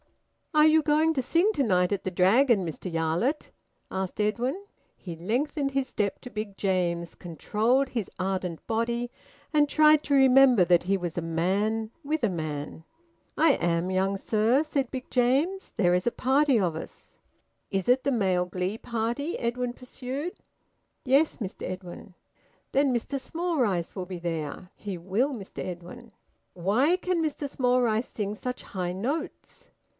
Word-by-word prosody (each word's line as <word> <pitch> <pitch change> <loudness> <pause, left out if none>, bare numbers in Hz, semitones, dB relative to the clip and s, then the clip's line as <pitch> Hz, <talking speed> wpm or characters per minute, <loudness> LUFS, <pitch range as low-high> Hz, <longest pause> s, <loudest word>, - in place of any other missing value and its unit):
"Are 305 0 +6
you 315 0 +6
going 310 +2 +3
to 270 - 0
sing 345 - +2
to 285 - +1
night 180 -5 +2
at 200 - -3
the 185 - -2
Dragon, 200 +3 +4
Mr 170 +3 -5
Yarlett?" 165 - -1 0.4
asked 190 +1 -4
Edwin. 245 - -1 0.3
He 175 -3 -7
lengthened 275 - -1
his 270 -1 0
step 200 -2 -2
to 250 - -9
Big 215 -4 -6
James's, 175 -3 -1
controlled 220 - 0
his 230 -6 -3
ardent 185 -3 -3
body, 235 +2 -1 0.4
and 295 -1 +4
tried 305 0 +5
to 285 - -1
remember 265 -6 +6
that 175 0 +4
he 195 +2 +1
was 175 -3 -5
a - - 0
man 200 +7 0
with 305 +2 -1
a 225 - +3
man. 155 -3 -5 0.5
"I 315 -2 +5
am, 170 -1 0
young 190 +1 +1
sir," 225 +8 +2
said 280 -5 -2
Big 260 -1 -6
James. 275 +10 +1
"There 180 -5 +3
is 180 +5 +1
a - - +3
party 270 0 +3
of 175 -5 0
us." 160 - -10 0.5
"Is 195 +1 -2
it 255 +2 +4
the 280 - +1
Male 190 -7 +1
Glee 185 +3 -3
Party?" 235 +7 -2
Edwin 240 +1 -1
pursued. 260 +6 -6 0.7
"Yes, 275 +4 +3
Mr 200 -6 -6
Edwin." 185 0 -7 0.6
"Then 275 0 +3
Mr 250 +3 -2
Smallrice 260 - -1
will 185 -2 -4
be 180 -1 -6
there?" 170 +1 -4
"He 200 -3 -6
will, 195 +10 0
Mr 200 -6 -7
Edwin." 180 +7 -8 0.4
"Why 230 - +2
can 365 -2 -1
Mr 300 -2 -2
Smallrice 245 -3 +1
sing 210 -1 -3
such 250 +3 -5
high 180 -2 -4
notes?" 300 - -5
225 Hz, 160 wpm, -27 LUFS, 185-275 Hz, 0.7 s, Are